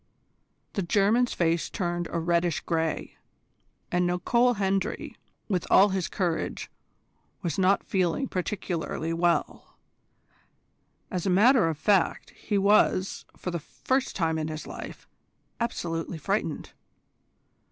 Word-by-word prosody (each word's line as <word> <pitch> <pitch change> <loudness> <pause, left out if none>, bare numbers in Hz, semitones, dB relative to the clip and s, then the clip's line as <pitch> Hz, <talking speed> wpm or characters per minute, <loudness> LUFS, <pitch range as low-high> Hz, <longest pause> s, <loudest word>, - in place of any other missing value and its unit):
The 200 - -1
German's 210 +7 +2
face 165 -1 0
turned 175 -2 -2
a - - -2
reddish 170 0 +1
grey, 160 -2 -2 0.7
and 180 0 +2
Nicol 235 +8 +2
Hendry, 195 0 -1 0.3
with 185 -5 -1
all 200 +2 +7
his 190 -2 -1
courage, 175 -4 -2 0.7
was 170 -1 -2
not 190 +1 +3
feeling 185 +8 0
particularly 175 -4 -3
well. 170 -2 -1 1.3
As 180 0 -2
a - - +2
matter 210 0 +5
of 160 - -3
fact, 195 +2 +1
he 210 - -2
was, 195 -1 +3
for 180 - -4
the 170 - -2
first 260 - -2
time 160 -3 0
in 155 - -2
his 155 -1 -5
life, - - -9 0.5
absolutely 170 -8 -3
frightened. 155 - -2
180 Hz, 120 wpm, -27 LUFS, 165-200 Hz, 1.3 s, all